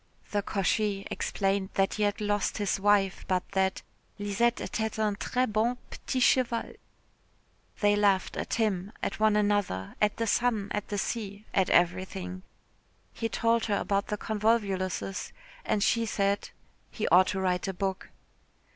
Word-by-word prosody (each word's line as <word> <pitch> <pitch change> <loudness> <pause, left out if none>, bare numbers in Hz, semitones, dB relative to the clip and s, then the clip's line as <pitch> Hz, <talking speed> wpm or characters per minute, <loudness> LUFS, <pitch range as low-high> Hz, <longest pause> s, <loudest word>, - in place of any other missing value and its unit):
The 205 - +1
cocher 200 0 0
explained 195 -1 -1
that 195 0 +2
he 215 - -3
had 205 -1 +1
lost 205 -1 0
his 205 -2 0
wife, 200 -1 +2
but 185 -1 0
that 190 -1 0 0.3
"Lisette 205 +4 +1
était 220 -1 -3
un 215 -2 +1
très 255 +5 0
bon 220 +4 +1
petit 260 - -3
cheval." 250 -2 +2 1.1
They 205 0 +4
laughed 200 -2 +2
at - - -2
him, 210 -3 0
at - - -2
one 215 -1 +4
another, 205 - 0
at 210 -1 +2
the 230 - 0
sun, 225 -2 +1
at 210 - -2
the 205 - -3
sea, 200 0 -3
at 190 -2 +2
everything. 185 +1 +1 0.7
He 225 - -2
told 230 +1 +1
her 205 -2 +1
about 200 0 0
the 210 - -2
convolvuluses, 200 -4 -1 0.3
and 205 - +1
she 230 0 +2
said 200 -1 0 0.4
he 220 - -3
ought 185 +2 +6
to 190 - -1
write 180 -1 0
a - - 0
book. 190 0 -3
205 Hz, 155 wpm, -29 LUFS, 195-215 Hz, 1.1 s, ought